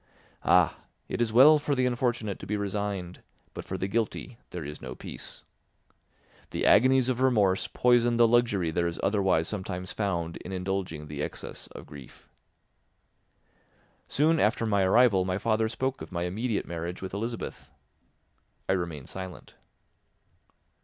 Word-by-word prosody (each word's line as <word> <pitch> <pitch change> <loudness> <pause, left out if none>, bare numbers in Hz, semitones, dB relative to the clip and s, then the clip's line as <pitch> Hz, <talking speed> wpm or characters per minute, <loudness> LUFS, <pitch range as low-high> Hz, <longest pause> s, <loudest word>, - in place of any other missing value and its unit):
Ah! - - +4 0.3
It - - -3
is 115 -2 +1
well 145 +7 +8
for 145 -1 -1
the 130 -1 +2
unfortunate 120 -4 -1
to - - -9
be 105 - -1
resigned, 100 -3 -3 0.3
but - - -6
for - - -4
the 95 - -2
guilty 115 +3 -2
there - - -6
is 75 +1 -7
no 65 -1 -7
peace. - - -8 1.1
The - - -2
agonies 130 +4 +5
of 130 -1 -1
remorse 105 -8 +3
poison 120 -1 +3
the 120 -1 +6
luxury 110 -8 +2
there 85 +2 0
is 85 - -4
otherwise 95 -5 +2
sometimes 90 -3 -4
found 85 -5 -2
in 90 - -9
indulging 90 -4 -3
the 75 -1 -6
excess - - -5
of - - -11
grief. 70 -4 -13 1.8
Soon 155 +3 +2
after 115 0 +2
my 100 -3 +2
arrival 100 0 +5
my 90 0 -1
father 110 +1 +1
spoke 130 +3 -2
of - - -8
my 85 -1 -2
immediate 105 +5 -2
marriage 85 +2 -5
with 95 - -6
Elizabeth. 115 +3 -5 1.0
I - - +2
remained 85 -7 -3
silent. 95 -1 -8
100 Hz, 150 wpm, -28 LUFS, 90-120 Hz, 1.8 s, well